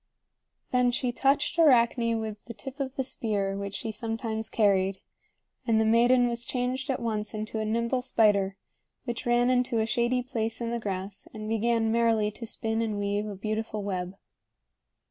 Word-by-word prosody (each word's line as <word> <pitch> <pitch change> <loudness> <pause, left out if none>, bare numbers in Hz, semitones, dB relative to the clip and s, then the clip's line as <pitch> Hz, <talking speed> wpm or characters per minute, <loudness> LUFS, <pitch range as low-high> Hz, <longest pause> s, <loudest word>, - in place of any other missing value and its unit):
Then 250 -1 +3
she 245 0 0
touched 285 +6 +1
Arachne 235 -5 +4
with 215 -1 -5
the 235 - -8
tip 270 +1 -9
of 270 -1 -3
the 265 - 0
spear 205 -6 -1
which 200 0 -4
she 225 - -3
sometimes 225 0 -3
carried; 195 -3 +2 0.7
and 225 -1 +4
the 220 - +3
maiden 240 +2 +5
was 235 0 -1
changed 255 +2 -2
at 265 - 0
once 220 -2 -3
into 215 +1 -3
a 215 - -1
nimble 235 +3 0
spider, 200 -5 +2 0.5
which 240 0 -4
ran 240 +1 +3
into 250 -2 +1
a 220 - +2
shady 240 +2 +1
place 225 -3 -3
in 235 -1 -2
the 235 - -1
grass 195 -2 -4
and 215 0 -6
began 225 0 +1
merrily 225 -2 +2
to 230 +2 -8
spin 225 0 -1
and 215 -2 -1
weave 205 +1 -1
a 205 - -5
beautiful 215 +1 -3
web. 185 -1 -3
225 Hz, 175 wpm, -28 LUFS, 215-245 Hz, 0.7 s, maiden